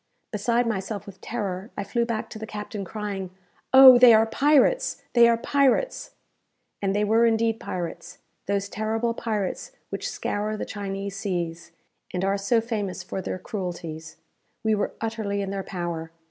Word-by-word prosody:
Beside 235 +3 +1
myself 205 -1 -3
with 195 -2 -12
terror, 200 -3 -4
I 200 - -2
flew 235 +4 0
back 230 -2 -3
to 215 - -7
the 220 - -6
captain, 210 -1 -6
crying, 195 -1 -5 0.4
"Oh, 265 -2 +10
they 240 -2 +9
are 220 +1 +5
pirates! 295 - +2
they 235 -1 +7
are 230 - +3
pirates!" 280 - +1 0.7
And 195 -1 0
they 210 - +2
were 225 +3 +4
indeed 225 0 +1
pirates 175 -2 -6 0.3
those 200 0 0
terrible 220 +3 -1
pirates 220 - -3 0.2
which - - -3
scour 210 +1 -2
the - - -4
Chinese 200 -1 -5
seas, 170 -4 -3 0.4
and 180 +1 0
are 195 +1 +2
so 225 +4 +2
famous 205 -5 -3
for 190 - -5
their 185 - -4
cruelties. 170 -5 -6 0.5
We 220 0 +2
were 205 -1 -1
utterly 215 -3 -2
in 195 - -4
their 195 0 -2
power. 170 -3 -4
210 Hz, 160 wpm, -25 LUFS, 195-230 Hz, 0.7 s, Oh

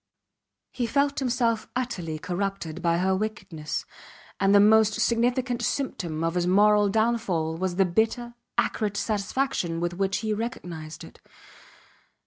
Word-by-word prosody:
He 245 -2 -2
felt 280 +2 +1
himself 235 -4 0
utterly 200 -11 -3
corrupted 180 -1 -3
by 170 -1 +2
her 190 +2 +2
wickedness, 185 -7 -4 0.5
and 195 - +3
the - - +8
most 215 +1 +5
significant 245 +2 +1
symptom 175 - -2
of 165 0 0
his 175 0 0
moral 205 +2 +5
downfall 220 -7 0
was 185 0 -2
the 195 +1 +4
bitter, 225 +6 0 0.2
acrid 205 -2 0
satisfaction 205 -4 -1
with 175 0 -1
which 195 +2 0
he 215 - +1
recognized 170 -9 -6
it. - - -13
205 Hz, 130 wpm, -26 LUFS, 175-235 Hz, 0.5 s, the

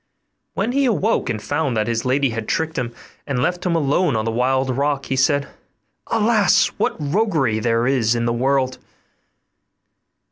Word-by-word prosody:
When 200 +5 -1
he 275 +2 +1
awoke 210 - +1
and 110 -2 -2
found 125 +4 -2
that 110 - +1
his 115 0 -2
lady 135 0 +1
had 115 -1 -5
tricked 160 0 -1
him, 120 -2 -2 0.4
and 140 -3 -2
left 175 +8 -1
him 170 - +1
alone 150 -1 +1
on 110 0 -1
the 115 - -1
wild 130 +2 0
rock, 140 0 -1
he 135 - -2
said, 140 +2 +2 0.6
'Alas! 215 -3 +3
what - - 0
roguery 150 - 0
there 115 +1 +1
is 120 -3 +2
in 115 0 -1
the 115 - 0
world! 130 +1 0
135 Hz, 170 wpm, -20 LUFS, 120-160 Hz, 0.6 s, Alas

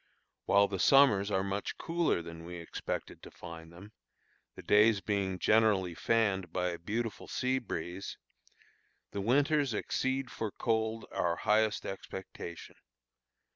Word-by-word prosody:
While 100 0 +5
the 95 -1 -4
summers 120 -8 +5
are 95 -2 +1
much 100 +1 -3
cooler 165 - 0
than 85 0 -9
we 90 +1 -7
expected 85 -1 -5
to - - -11
find 80 -1 -10
them, 95 +5 -13 0.6
the - - -10
days 105 0 +5
being 100 -2 -1
generally 105 -3 +3
fanned 95 -3 +1
by 90 0 0
a 85 - -5
beautiful 110 +4 -3
sea 130 +1 0
breeze, 90 -4 -5 0.9
the 100 - -3
winters 140 +3 +2
exceed 130 +3 -1
for 110 - -3
cold 110 +1 -1
our 85 -1 0
highest 110 +3 +1
expectation. 95 -3 -8
100 Hz, 135 wpm, -32 LUFS, 90-115 Hz, 0.9 s, While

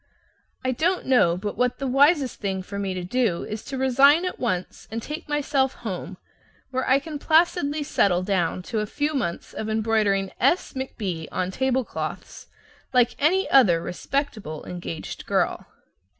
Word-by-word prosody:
I 255 - +2
don't 335 +8 0
know 210 -10 +4
but 205 +2 -4
what 250 0 +1
the 275 - -4
wisest 275 +1 +3
thing 190 -2 -2
for 200 +2 -6
me 195 -2 -2
to 180 - -4
do 210 -2 0
is 215 +1 -6
to 270 - -5
resign 275 +6 +5
at 365 - -4
once 185 -7 -3
and 225 - -3
take 300 +7 -7
myself 280 -2 +1
home, 195 -6 -6 0.5
where 260 -1 -1
I 260 - +6
can 295 +1 -6
placidly 315 -2 +2
settle 185 -10 +2
down 185 -2 0
to 220 +3 -2
a 210 - -2
few 295 +6 -1
months 235 - -3
of 220 - -4
embroidering 215 -3 +1
"S 280 +8 +2
McB" 200 -11 -4
on 185 0 -2
table 260 +3 0
cloths, - - -6 0.5
like 245 -2 +3
any 365 +7 +3
other 205 -12 +6
respectable 195 - -3
engaged 175 -2 -6
girl. - - 0
245 Hz, 165 wpm, -24 LUFS, 195-280 Hz, 0.5 s, I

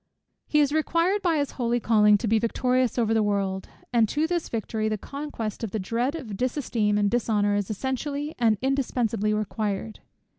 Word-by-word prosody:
He 300 - +3
is 290 0 +2
required 335 +5 +1
by 340 -4 +2
his 285 -1 -1
holy 240 -1 0
calling 210 -2 +5
to 225 - -3
be 220 +1 +3
victorious 250 +2 +1
over 225 -2 +2
the 220 - +3
world; 195 -2 -1 0.2
and 230 -3 +4
to 300 +2 +1
this 345 0 -2
victory, 220 -1 -2
the 215 - -1
conquest 240 -4 -5
of 225 - -2
the 220 - -3
dread 235 - -1
of 265 -10 -7
its 200 - -5
dis 255 +5 -1
esteem 215 -7 0
and 205 -1 +2
dishonour 210 -2 +1
is 205 -1 -1
essentially 280 +6 -3
and 225 -3 +3
indispensably 240 -6 0
required. 215 0 -2
230 Hz, 190 wpm, -26 LUFS, 210-275 Hz, 0.2 s, calling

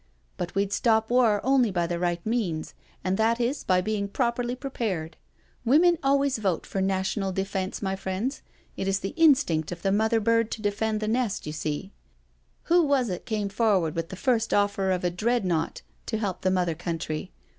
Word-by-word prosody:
" - - -40
But 175 +1 -4
we'd 200 0 0
stop 220 -1 +2
war 235 -4 +4
only 265 -3 +3
by 175 -3 0
the 170 0 -2
right 175 -1 -1
means, 205 -9 -1 0.3
and 185 +2 0
that 230 +2 +2
is 245 +4 -1
by 180 -1 +3
being 205 +1 -1
properly 240 +2 -1
prepared. 205 - -3 0.5
Women 320 +7 +4
always 275 -2 +2
vote 190 -6 -1
for 195 - -3
National 190 +1 0
Defence, 190 +1 -3
my 190 0 0
friends 190 +8 -3 0.2
— - - -35
it 190 - -2
is 195 0 +1
the 195 - -4
instinct 265 - +3
of 170 -1 -7
the 195 - +2
mother 220 +3 +2
bird 230 +1 +2
to 220 - -6
defend 215 +1 0
the 215 - -1
nest, 225 -2 0
you 150 - -4
seel 155 +5 -4 0.7
Who 345 +1 +4
was 280 -6 +2
it 180 - -5
came 210 -3 -1
forward 195 -7 +2
with 165 0 -3
the - - -6
first 225 +1 +1
offer 200 -1 +1
of 185 -1 0
a 175 - +1
Dreadnought 180 -4 0 0.2
to 220 - -1
help 200 -4 -3
the 185 - +2
Mother 180 -3 +1
Country? 160 - -4
205 Hz, 195 wpm, -26 LUFS, 180-235 Hz, 0.7 s, war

